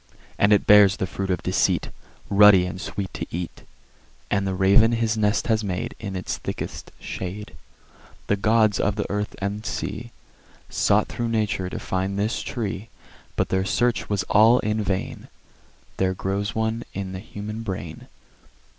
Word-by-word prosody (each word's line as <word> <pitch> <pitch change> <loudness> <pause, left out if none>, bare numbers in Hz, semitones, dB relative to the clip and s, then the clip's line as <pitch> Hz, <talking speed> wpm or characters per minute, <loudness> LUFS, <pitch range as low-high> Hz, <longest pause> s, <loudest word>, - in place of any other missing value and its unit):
And 100 - +4
it 105 - +4
bears 100 -1 +7
the - - -1
fruit 95 +1 -4
of 90 -3 -1
Deceit, - - +1 0.4
Ruddy 100 -2 +7
and 90 +1 -5
sweet 100 -2 -5
to - - -5
eat; 85 0 -5 0.7
And 100 -1 +1
the 95 - -1
Raven 100 +5 +5
his 115 -1 +1
nest 105 0 +1
has 110 -2 +1
made 90 -3 -3
In 100 -3 -5
its 95 - -3
thickest - - -5
shade. 100 +3 -6 0.7
The 105 - +2
Gods 110 0 +3
of 100 +1 +1
the 105 - -2
earth 105 0 -2
and 100 +2 -3
sea 110 +2 -4 0.6
Sought 105 +1 +2
thro' 120 - -3
Nature 105 -5 -1
to - - -5
find 95 +1 -2
this 105 +3 -1
Tree; 110 -2 -4 0.5
But - - 0
their 95 0 +1
search 120 +5 0
was 100 -2 0
all 110 +4 +5
in 110 +1 0
vain: 95 -2 -3 0.7
There 95 0 +1
grows 100 +3 -2
one 110 +1 -1
in 95 -1 -4
the 95 - -5
Human 105 +2 -7
Brain. 95 -7 -6
100 Hz, 165 wpm, -24 LUFS, 95-110 Hz, 0.7 s, bears